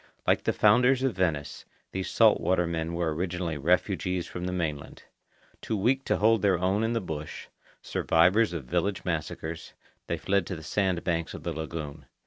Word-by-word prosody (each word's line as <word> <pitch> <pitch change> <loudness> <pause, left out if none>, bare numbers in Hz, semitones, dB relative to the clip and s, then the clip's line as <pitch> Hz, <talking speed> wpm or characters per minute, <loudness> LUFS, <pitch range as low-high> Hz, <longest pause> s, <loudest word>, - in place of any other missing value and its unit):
Like - - +2
the - - +3
founders 125 +5 +4
of 135 -3 0
Venice, 75 -6 -1 0.3
these 95 0 -3
salt - - +4
water 90 -1 +2
men 85 0 -3
were 85 -2 0
originally 85 -2 -3
refugees 90 +2 +1
from 90 0 -6
the 90 - -2
mainland. 80 -6 -4 0.6
Too 110 - -2
weak 130 +7 +1
to - - +1
hold 110 0 +3
their 100 -3 +3
own 95 +5 +1
in 115 +1 0
the 115 - +1
bush, 75 -5 -6 0.3
survivors 95 +7 +3
of 85 -6 -5
village 90 +7 -1
massacres, 80 -1 -4 0.3
they - - -1
fled 100 -2 0
to 95 - -4
the 80 - -9
sand 95 +2 0
banks 85 -1 -2
of - - -9
the - - -3
lagoon. 80 -2 -6
90 Hz, 180 wpm, -28 LUFS, 80-100 Hz, 0.6 s, founders